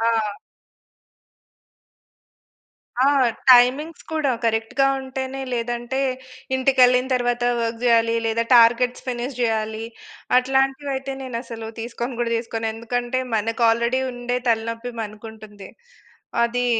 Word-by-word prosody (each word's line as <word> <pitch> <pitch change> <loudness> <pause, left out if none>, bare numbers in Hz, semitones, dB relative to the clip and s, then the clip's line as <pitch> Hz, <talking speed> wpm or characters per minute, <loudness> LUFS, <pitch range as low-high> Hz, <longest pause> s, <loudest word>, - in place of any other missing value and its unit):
ఆ! 225 -2 +1 2.7
ఆ! 260 - +4 0.5
టైమింగ్స్ 260 +7 +4
కూడా, 305 -4 +1
కరెక్ట్‌గా 225 +5 +1
ఉం‌టేనే, 265 0 -5
లేదంటే, 240 +2 -2 0.6
ఇంటికెళ్ళిన 255 -1 +4
తరవాత 245 -1 0 0.2
వర్క్ 230 0 -2
జేయాలి, 230 -1 +3
లేదా 225 +1 +1
టార్గెట్స్ 240 +2 +4
ఫినిష్ 250 +1 -4
జేయాలి, 220 -1 -1 0.5
అట్లాంటివయితే 270 +1 0
నేనసలు 230 -3 -6
తీసుకోను 240 +1 -5
గూడా 235 -1 -1
తీసుకోను. 225 -1 -4
ఎందుకంటే, 240 +2 -2
మనకు 225 +2 -1
ఆల్రెడీ 235 +3 +1
ఉండే 245 0 -3
తలనొప్పి 230 +2 -2
మనకుంటుంది. 215 -2 -10 0.7
అది 245 +1 0
240 Hz, 95 wpm, -22 LUFS, 230-255 Hz, 2.7 s, ఆ